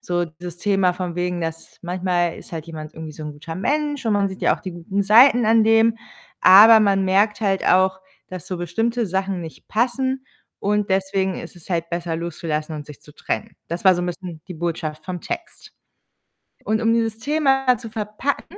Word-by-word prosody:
so 175 -7 -1
das 170 +1 -9
Thema 195 -1 +2
von 180 -1 -5
wegen, 180 0 -2
dass 165 0 -6
manchmal 175 -1 -1
ist - - -13
halt 160 -1 -6
jemand 155 -2 -8
irgendwie 160 -1 -8
so 155 - -10
'n 150 - -6
guter 160 +3 -8
Mensch, 290 - -1
und 220 - +2
man 200 -1 +2
sieht 190 0 -10
ja - - +3
auch - - -17
die 185 -3 -6
guten 180 +4 -2
Seiten 235 +3 +6
an 225 0 +5
dem, 225 +1 +4 0.4
aber 220 +4 +9
man 195 -2 +2
merkt 205 +3 +2
halt 195 -3 0
auch, 190 +1 +3 0.3
dass 185 -3 -8
so 185 - -4
bestimmte 225 +7 -1
Sachen 190 0 -2
nicht 165 -2 -10
passen, 260 +3 0 0.4
und 210 0 0
deswegen 190 0 0
ist 165 - -9
es 175 +1 -14
halt 170 -1 -1
besser 170 -1 -3
loszulassen 160 -2 -4
und 150 - -6
sich 150 -2 -12
zu 150 -1 -17
trennen. - - -4
Das 170 +3 -5
war 190 -1 +7
so 175 - -2
'n - - -2
bisschen 175 -2 -6
die 180 - -6
Botschaft 160 -2 -4
vom 180 -1 -5
Text 345 - -7 0.9
und 220 +1 0
um 225 0 +3
dieses 225 -1 0
Thema 270 -1 +2
zu 230 - -9
verpacken, 220 - -4
190 Hz, 200 wpm, -21 LUFS, 170-225 Hz, 0.9 s, aber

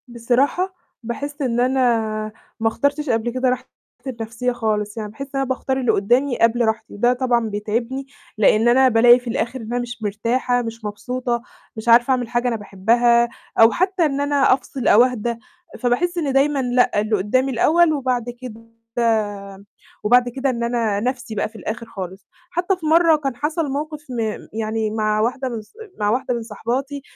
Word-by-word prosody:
بصراحة 255 +10 0 0.3
باحس 285 +6 -5
إن 240 -3 0
أنا 260 +2 +2 0.8
ما 225 - +1
اخترتش 285 +5 0
قبل 230 0 +1
كده 255 +1 +1
راحتي 250 - -2 0.4
النفسية 230 0 -3
خالص، 215 -3 -2
يعني 215 -1 -4
باحس 275 +6 -7
إن 270 - +1
أنا - - +1
باختار 265 0 -2
اللي 250 -3 +2
قُدّامي 245 +6 +1
قبل 230 +1 +3
راحتي، 220 0 -2
وده 240 +4 +2
طبعًا 245 -3 0
بيتعبني 230 +6 -3 0.3
لإن 215 +2 +4
أنا 260 +2 +5
بالاقي 240 +1 +6
في 245 - -13
الآخر 235 +3 -2
إن 225 +2 -6
أنا 245 - 0
مش 240 -2 -7
مرتاحة، 235 +4 0
مش 230 -1 -7
مبسوطة، 240 +3 -3 0.3
مش 220 +1 -8
عارفة 240 +3 +6
أعمل 250 -2 +1
حاجة 240 +1 0
أنا 240 - 0
باحبها، 235 +4 +2 0.3
أو 225 0 +8
حتى 370 -1 +1
إن 280 -2 -1
أنا 285 -2 +3
أفصل 260 -1 -3
أو 230 - +7
أهدى، 240 -2 -1 0.4
فباحس 260 +9 0
إن 295 -5 -1
دايمًا 275 +1 +2
لأ 245 -4 +2
اللي 215 +1 0
قُدّامي 255 +8 +1
الأول 315 +7 +3
وبعد 255 -4 -1 0.2
كده 230 -3 -9 1.4
وبعد 245 +3 +4
كده 270 +3 -2
إن 235 -2 -2
أنا 230 -4 0
نَفْسي 245 -1 -3
بقى 210 - -1
في 225 - -25
الآخر 225 +2 -5
خالص، 190 -3 -8 0.2
حتى 355 +3 0
في 330 - -9
مرّه 325 +1 +5
كان 275 -4 -3
حَصَل 295 +2 -2
موقف 300 +2 -4
م 245 -2 -4 0.3
يعني 220 0 -2
مع 215 -1 0
واحدة 255 +4 -1
من 230 -3 -5
ص 210 - -22 0.3
مع 205 0 +1
واحدة 250 +3 0
من 235 -1 -3
صاحباتي، 255 +6 -4
245 Hz, 180 wpm, -21 LUFS, 225-265 Hz, 1.4 s, أو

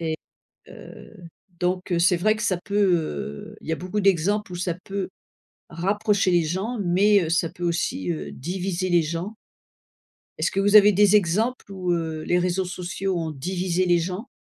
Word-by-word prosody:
Et 160 -1 -2 0.5
heu, - - -13 0.5
donc 180 +1 -1
c'est 175 +1 +4
vrai 215 +5 +2
que 215 - -5
ça 185 - +1
peut, 205 - -3 0.2
heu 70 - -4
il - - -13
y - - 0
a - - 0
beaucoup 185 +5 -3
d'exemples 195 +1 +1
où 175 - -4
ça 175 0 -1
peut 195 -1 -3 0.6
rapprocher 200 +3 +1
les 175 -1 +4
gens 190 +9 -3
mais 195 +3 +4
heu, - - -3
ça 170 0 +1
peut 175 - -7
aussi, 165 - -1
heu, 75 -2 -6
diviser 185 - -3
les 175 -1 +4
gens. 170 +7 -4 1.0
Est-ce - - +1
que 195 - -1
vous 205 +1 +5
avez 210 0 +8
des 205 +1 +5
exemples 210 +5 0
où 180 -2 -2
heu, 160 -2 -2
les 175 - +2
réseaux 180 +1 0
sociaux 180 +1 -3
ont 160 -1 -3
divisé 180 +4 -1
les 175 -1 +4
gens? 185 +7 -4
180 Hz, 185 wpm, -24 LUFS, 170-200 Hz, 1.0 s, avez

